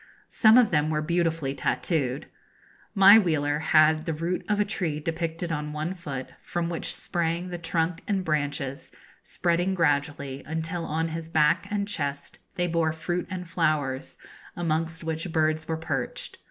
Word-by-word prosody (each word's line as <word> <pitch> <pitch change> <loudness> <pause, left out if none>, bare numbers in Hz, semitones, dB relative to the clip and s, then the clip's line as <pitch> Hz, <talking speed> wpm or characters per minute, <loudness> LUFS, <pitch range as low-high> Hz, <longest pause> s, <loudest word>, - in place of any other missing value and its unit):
Some 220 +1 +6
of 235 -4 +5
them 150 -2 +2
were 155 -1 0
beautifully 165 -4 0
tattooed. 140 -2 -1 0.7
My 200 +2 +9
wheeler 150 -6 +1
had 155 0 +4
the 165 - 0
root 170 +4 -2
of 210 0 +2
a 210 - +3
tree 170 -7 -2
depicted 165 +2 -3
on 150 -1 -3
one 155 +4 -2
foot, 140 -8 -6
from 170 -1 -2
which 170 - -2
sprang 170 0 -2
the 175 -1 -5
trunk 165 0 -1
and 195 -3 0
branches, 145 -3 -2 0.3
spreading 175 +2 0
gradually, 145 -4 0
until 160 +2 -3
on 160 +2 -1
his 160 0 -5
back 160 +4 +3
and 205 -1 -1
chest 145 -7 -4 0.2
they 175 - 0
bore 165 -2 +1
fruit 175 +2 -3
and 180 -2 -5
flowers, 155 -6 -1 0.4
amongst 165 0 -2
which 160 +2 -3
birds 155 -1 +1
were 160 - -1
perched. 140 -6 -4
160 Hz, 155 wpm, -26 LUFS, 150-175 Hz, 0.7 s, My